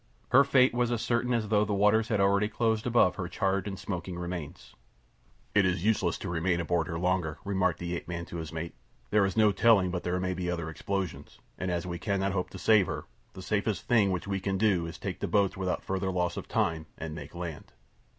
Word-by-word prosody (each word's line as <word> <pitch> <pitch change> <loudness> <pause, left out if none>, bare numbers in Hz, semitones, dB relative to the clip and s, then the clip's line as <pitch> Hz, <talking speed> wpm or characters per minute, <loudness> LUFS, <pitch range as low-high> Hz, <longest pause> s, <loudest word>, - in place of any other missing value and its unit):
Her 140 - +7
fate 130 -2 +4
was 120 0 +1
as 120 -2 -1
certain 120 +1 0
as 115 -3 0
though 105 -1 +4
the 105 -1 -1
waters 105 +2 +3
had 105 -3 0
already 100 +1 +3
closed 110 +1 0
above 120 -6 +3
her 90 - -3
charred 95 +2 -1
and 95 -1 -4
smoking 90 -1 -5
remains. 85 -3 -6 0.8
"It 105 - +5
is 90 -1 0
useless 100 -5 +2
to - - -6
remain 85 0 0
aboard 85 -1 0
her 80 - -3
longer," 90 -3 0
remarked 95 -2 +1
the 85 0 -3
ape - - -6
man 85 0 -4
to 85 -1 -5
the 80 - -8
mate. 85 +1 -4 0.4
"There 105 -2 +4
is 95 - -5
no 110 -1 +5
telling 100 -3 +4
but 90 -1 -2
there 90 +1 -1
may 90 0 -1
be 90 -1 -3
other 85 -2 -3
explosions, 85 -3 -4 0.2
and 90 - -3
as 85 -1 -1
we 85 -1 -4
cannot 100 -1 0
hope 90 -1 -2
to - - -9
save 110 -4 +4
her, - - -4 0.3
the 95 - -9
safest 105 0 -1
thing 110 -5 +4
which 90 -2 -2
we 100 -1 -1
can 95 0 -1
do 95 -5 +2
is 85 - -7
to - - -14
take - - -3
to - - -3
the - - -9
boats 100 -2 +2
without 95 -2 -2
further 95 0 -2
loss 90 -1 0
of - - -6
time 80 -2 0
and 80 0 -5
make 75 0 -9
land." 85 -3 -6
95 Hz, 240 wpm, -29 LUFS, 85-105 Hz, 0.8 s, Her